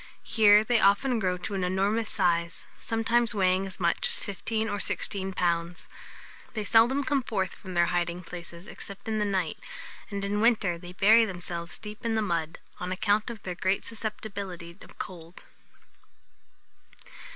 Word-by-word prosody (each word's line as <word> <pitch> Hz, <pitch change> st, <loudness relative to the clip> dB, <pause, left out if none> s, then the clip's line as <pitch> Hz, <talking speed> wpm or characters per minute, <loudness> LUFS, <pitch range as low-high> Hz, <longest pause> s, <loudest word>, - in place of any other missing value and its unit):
Here 210 Hz, -2 st, +6 dB
they 235 Hz, +1 st, +3 dB
often 225 Hz, +5 st, +3 dB
grow 185 Hz, -3 st, 0 dB
to 180 Hz, +3 st, -5 dB
an 190 Hz, -2 st, -1 dB
enormous 200 Hz, +4 st, +1 dB
size, 170 Hz, -3 st, 0 dB
sometimes 230 Hz, +1 st, +1 dB
weighing 190 Hz, 0 st, +2 dB
as 185 Hz, -, -9 dB
much 170 Hz, -2 st, +1 dB
as -, -, +1 dB
fifteen 220 Hz, +3 st, -2 dB
or 205 Hz, -1 st, -2 dB
sixteen 195 Hz, -1 st, -2 dB
pounds. 170 Hz, -1 st, -1 dB, 0.7 s
They 215 Hz, -, -1 dB
seldom 235 Hz, +6 st, +4 dB
come 275 Hz, +1 st, +1 dB
forth 195 Hz, -6 st, -2 dB
from 185 Hz, -2 st, -9 dB
their 175 Hz, 0 st, +5 dB
hiding 175 Hz, +1 st, -1 dB
places 170 Hz, 0 st, -9 dB
except 200 Hz, 0 st, -9 dB
in 220 Hz, -1 st, 0 dB
the 210 Hz, -, +1 dB
night; 190 Hz, -5 st, -1 dB, 0.5 s
and, 200 Hz, -1 st, -3 dB
in 205 Hz, +1 st, 0 dB
winter, 210 Hz, -7 st, +3 dB
bury 195 Hz, +6 st, +4 dB
themselves 175 Hz, -4 st, -5 dB
deep 210 Hz, -1 st, -9 dB
in 230 Hz, -1 st, 0 dB
the 220 Hz, -, +1 dB
mud, 165 Hz, -4 st, -2 dB, 0.2 s
on 180 Hz, +1 st, -4 dB
account 205 Hz, +4 st, +1 dB
of 225 Hz, -3 st, -8 dB
their 180 Hz, -, -3 dB
great 190 Hz, +2 st, 0 dB
susceptibility 200 Hz, -6 st, -6 dB
of -, -, -15 dB
cold. 170 Hz, -1 st, -8 dB
195 Hz, 160 wpm, -28 LUFS, 180-220 Hz, 0.7 s, Here